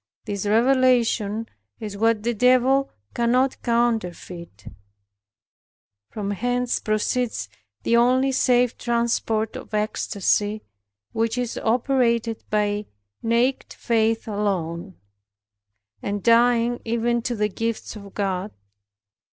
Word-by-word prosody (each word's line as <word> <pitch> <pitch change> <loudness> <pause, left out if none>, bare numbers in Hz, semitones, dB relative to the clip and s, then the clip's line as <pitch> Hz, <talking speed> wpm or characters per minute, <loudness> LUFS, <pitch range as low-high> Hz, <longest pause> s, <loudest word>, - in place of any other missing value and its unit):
This 205 0 -3
revelation 230 -2 +2 0.3
is 210 -2 -6
what 225 0 +1
the 240 +1 0
Devil 255 +4 +3 0.2
cannot 250 +3 +1
counterfeit. 180 - -2 1.4
From 205 -2 -4
hence 245 +4 -1
proceeds 215 - -1 0.4
the 235 - +3
only 255 +3 +3
safe 250 -2 +2
transport 235 -2 0
of 215 - -7
ecstasy, 210 0 0 0.5
which 225 +1 -1
is 245 -2 -2
operated 235 -1 +1
by 210 0 0 0.3
naked 235 +3 0
faith 225 -1 0
alone, 190 -4 -2 1.1
and 205 0 -3
dying 235 0 +3
even 235 +1 0
to 240 0 -2
the 210 -1 +1
gifts 225 +3 -4
of 200 -2 -11
God. 195 -1 -1
230 Hz, 100 wpm, -23 LUFS, 210-240 Hz, 1.4 s, Devil